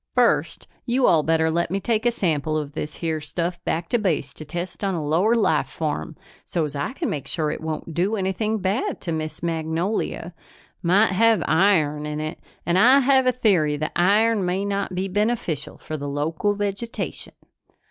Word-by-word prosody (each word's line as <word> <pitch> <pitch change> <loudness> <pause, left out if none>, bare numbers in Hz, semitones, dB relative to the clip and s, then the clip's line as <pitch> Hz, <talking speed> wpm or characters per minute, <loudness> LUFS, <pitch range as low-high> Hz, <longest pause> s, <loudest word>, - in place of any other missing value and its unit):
"First - - +2 0.2
you 250 +2 +2
all 160 - +5
better 160 +1 +2
let 170 0 0
me 195 +3 -1
take 225 +3 0
a - - +4
sample 155 -7 0
of 150 -2 -4
this 150 0 -5
here 160 -2 -2
stuff 175 +3 -3
back 165 +1 -1
to 240 - +2
Base 160 -9 -1
to 155 - -9
test 175 +5 -6
on 195 -2 0
a 155 -3 -3
lower 180 +10 +3
life 155 - +2
form, 145 - -3 0.3
so's 150 -4 -2
I 145 - -2
can 320 +3 -3
make 145 - -3
sure 155 -3 -1
it - - -5
won't 160 +1 -4
do 185 +7 +1
anything 210 +3 -1
bad 210 - -1
to 170 - -4
Miss 155 0 -4
Magnolia. 165 +2 -2 0.5
Might 190 +5 +4
have 220 0 +3
iron 155 -5 +3
in 150 0 -3
it 155 +2 -4 0.3
and 175 +2 +2
I 260 +6 +7
have 265 -1 +4
a - - +6
theory 185 -12 +2
that 155 +1 -2
iron 210 +4 +3
may 185 +2 -1
not 200 -2 -2
be 185 +2 -1
beneficial 205 - -1
for 155 - -6
the 145 -1 -4
local 160 +8 -1
vegetation." 205 +3 -4
175 Hz, 190 wpm, -23 LUFS, 155-205 Hz, 0.5 s, I